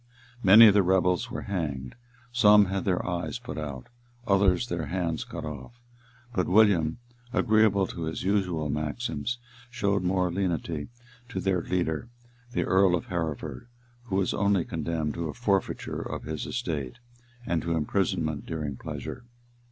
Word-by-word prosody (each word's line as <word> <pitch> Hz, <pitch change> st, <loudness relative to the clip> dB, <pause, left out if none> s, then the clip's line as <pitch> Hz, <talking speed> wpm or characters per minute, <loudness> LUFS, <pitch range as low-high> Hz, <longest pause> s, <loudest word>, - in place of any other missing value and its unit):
Many 105 Hz, +3 st, +9 dB
of 105 Hz, -, +6 dB
the 100 Hz, -, +5 dB
rebels 90 Hz, -1 st, +2 dB
were -, -, -5 dB
hanged; 75 Hz, -9 st, -3 dB, 0.4 s
some 105 Hz, -4 st, +6 dB
had 95 Hz, -1 st, -2 dB
their 90 Hz, -2 st, 0 dB
eyes 85 Hz, +3 st, -2 dB
put 125 Hz, -8 st, -7 dB
out; 70 Hz, -5 st, -6 dB, 0.4 s
others 100 Hz, +2 st, +3 dB
their 85 Hz, -6 st, -3 dB
hands 85 Hz, -1 st, -2 dB
cut -, -, -7 dB
off. 75 Hz, -, -8 dB, 0.5 s
But 90 Hz, -5 st, 0 dB
William, 95 Hz, -4 st, +4 dB, 0.3 s
agreeably 110 Hz, -5 st, +3 dB
to 85 Hz, -2 st, -5 dB
his 80 Hz, -, -4 dB
usual 90 Hz, -5 st, 0 dB
maxims, 75 Hz, -, -2 dB, 0.3 s
showed 100 Hz, -5 st, 0 dB
more 90 Hz, 0 st, +1 dB
lenity 85 Hz, -4 st, -2 dB, 0.4 s
to 95 Hz, -, -3 dB
their 95 Hz, -1 st, +1 dB
leader, 85 Hz, +2 st, -1 dB, 0.4 s
the -, -, 0 dB
earl 95 Hz, -1 st, +4 dB
of 110 Hz, +8 st, -5 dB
Hereford, 80 Hz, -, -4 dB, 0.4 s
who 100 Hz, -6 st, -3 dB
was 95 Hz, -1 st, +1 dB
only 100 Hz, -3 st, +2 dB
condemned 80 Hz, -1 st, -2 dB
to 85 Hz, -2 st, -3 dB
a 75 Hz, -, -6 dB
forfeiture -, -, -1 dB
of -, -, -5 dB
his 80 Hz, 0 st, -4 dB
estate, 75 Hz, -, -3 dB, 0.5 s
and 85 Hz, -6 st, 0 dB
to 85 Hz, -1 st, -1 dB
imprisonment 80 Hz, -2 st, -1 dB
during 75 Hz, -4 st, -4 dB
pleasure. -, -, -6 dB
90 Hz, 150 wpm, -27 LUFS, 80-100 Hz, 0.5 s, Many